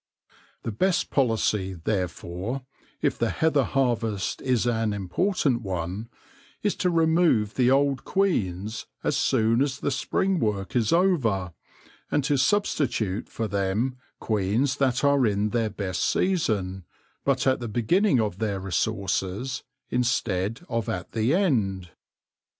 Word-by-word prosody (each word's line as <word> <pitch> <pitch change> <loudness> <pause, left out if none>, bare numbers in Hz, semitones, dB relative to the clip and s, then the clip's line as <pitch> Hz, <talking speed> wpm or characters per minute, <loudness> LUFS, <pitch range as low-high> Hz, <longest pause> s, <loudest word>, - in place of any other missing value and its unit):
The 115 - -2
best 185 - +1
policy, 110 -7 +1
therefore, 95 +6 -3 0.4
if - - +1
the - - +1
heather 155 -4 +2
harvest 115 -6 -1
is 125 -3 +1
an 115 -3 +1
important 125 - 0
one, 95 +2 -4 0.5
is 205 - +2
to 180 - +1
remove 160 - +3
the 125 -1 +3
old 135 0 +2
queens 110 - -1 0.2
as - - +1
soon 115 +3 +2
as 140 0 0
the 145 - -1
spring 190 +6 0
work 100 - -2
is 115 -4 +2
over, 125 - +2 0.6
and 145 - +1
to 145 +1 +2
substitute 130 - 0
for 115 - -3
them 100 +6 0 0.2
queens 110 +6 0
that 130 -2 +1
are 140 -3 +4
in 105 0 +1
their 115 -1 0
best 100 -3 -3
season, 105 - 0 0.4
but 140 -2 +1
at 130 -1 +3
the 120 - -4
beginning 130 - +2
of 105 -4 -1
their 105 -3 -1
resources 95 - -1 0.3
instead 115 - 0
of 115 -2 -2
at 90 -1 -4
the 115 +7 +1
end. 100 - 0
115 Hz, 135 wpm, -26 LUFS, 100-140 Hz, 0.6 s, are